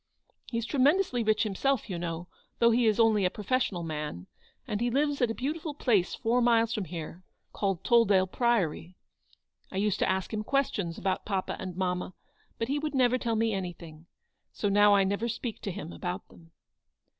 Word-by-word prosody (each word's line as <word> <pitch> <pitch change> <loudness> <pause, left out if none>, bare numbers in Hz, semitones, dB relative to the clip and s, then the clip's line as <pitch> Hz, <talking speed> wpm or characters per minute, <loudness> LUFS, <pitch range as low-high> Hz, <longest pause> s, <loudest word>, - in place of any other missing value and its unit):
He's 230 -2 -2
tremendously 285 0 +2
rich 215 0 +2
himself, 230 +5 0
you 180 -5 -4
know, 170 0 -4 0.3
though 235 0 +5
he 235 0 +3
is 215 +1 +2
only 220 -3 +4
a 180 - +3
pro 210 - -9
fessional 205 -7 0
man, 150 - -5 0.4
and 210 +1 -2
he 240 - +2
lives 285 +3 0
at 245 - +3
a 225 - -2
beautiful 300 +3 -3
place 210 -10 +1
four 240 +2 +1
miles 230 -1 +3
from 210 -4 -2
here, 170 +1 -7 0.3
called 195 -4 -1
Tolldale 205 -5 +4
Priory. 185 -6 0 0.7
I 190 - -6
used 205 0 +1
to - - +2
ask 190 +3 -1
him 215 0 -2
questions 210 -10 -1
about 185 0 -1
papa 195 -3 -2
and 185 -2 -6
mamma, 180 -1 -2 0.4
but 230 - -2
he 285 +3 0
would 300 -1 -3
never 255 -1 +3
tell 230 -2 -1
me 225 0 +1
anything. 170 -4 -6 0.4
So 205 - -1
now 205 0 +6
I 195 - +4
never 200 +4 -1
speak 235 0 -4
to 200 - -3
him 175 -3 -7
about 180 +1 -5
them." 165 -1 -18
210 Hz, 190 wpm, -29 LUFS, 185-240 Hz, 0.7 s, now